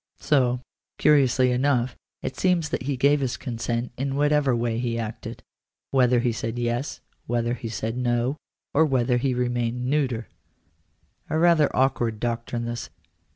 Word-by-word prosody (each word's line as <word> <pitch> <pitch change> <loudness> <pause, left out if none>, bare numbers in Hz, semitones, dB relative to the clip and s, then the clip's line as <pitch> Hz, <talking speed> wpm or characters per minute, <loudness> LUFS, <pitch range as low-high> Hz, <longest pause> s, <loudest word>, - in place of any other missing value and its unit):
So, 125 -4 +2 0.4
curiously 130 -4 +4
enough, 125 -1 +1 0.3
it - - -3
seems 175 -4 +1
that - - -2
he 135 +1 -2
gave 145 +3 +4
his 130 -3 -2
consent 120 0 -3
in 135 +1 -2
whatever 145 -2 +3
way 115 -1 -1
he 120 -1 -1
acted 110 -1 -6 0.2
— - - -64
whether 125 -2 +4
he 120 -1 +1
said 115 +1 -4
yes, 120 +3 -2 0.3
whether 120 0 0
he 115 -1 -5
said 110 +1 -3
no, 125 +2 0 0.4
or 155 - +5
whether 125 -4 +2
he 125 +1 0
remained 120 0 -1
neuter! 130 -4 0 1.0
A 155 - 0
rather 165 -3 +5
awkward 120 -4 +1
doctrine 120 0 -2
this. 120 0 -4
125 Hz, 155 wpm, -25 LUFS, 120-140 Hz, 1.0 s, or